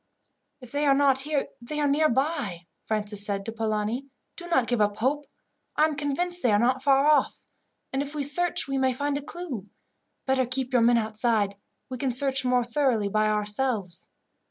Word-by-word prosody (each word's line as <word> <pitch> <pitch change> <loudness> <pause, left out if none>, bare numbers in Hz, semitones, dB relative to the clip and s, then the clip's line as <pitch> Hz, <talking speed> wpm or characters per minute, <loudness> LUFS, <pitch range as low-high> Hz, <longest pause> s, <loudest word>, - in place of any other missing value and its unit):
"If 250 -2 -13
they 290 +1 0
are 275 - +5
not 275 -1 +3
here, 290 0 -2
they 300 +6 -4
are 295 - +2
near 305 +2 +3
by," 260 - -2 0.2
Francis 210 -1 0
said 200 -1 -2
to 225 - -4
Polani. 220 +3 -2 0.3
"Do 345 - -7
not 295 -8 +2
give 240 -2 0
up 205 -1 +1
hope. 285 +5 -1 0.5
I 305 - +4
am 310 -1 -2
convinced 345 +5 0
they 240 - +2
are 205 - +4
not 255 +4 +1
far 275 0 +3
off; 300 -1 +2 0.5
and 270 - 0
if 290 +1 -6
we 295 - -1
search 345 +5 +3
we 275 -1 -1
may 260 -1 +2
find 285 +3 -2
a 285 - -3
clue. 280 - -7 0.6
Better 265 -2 +1
keep 255 0 -3
your 245 - +4
men 235 +1 +4
outside. 215 -2 0 0.3
We 255 -2 -7
can 270 - 0
search 265 +1 +2
more 250 -1 +2
thoroughly 240 -4 0
by 215 +1 +1
ourselves." 210 -2 -1
260 Hz, 195 wpm, -26 LUFS, 220-285 Hz, 0.6 s, are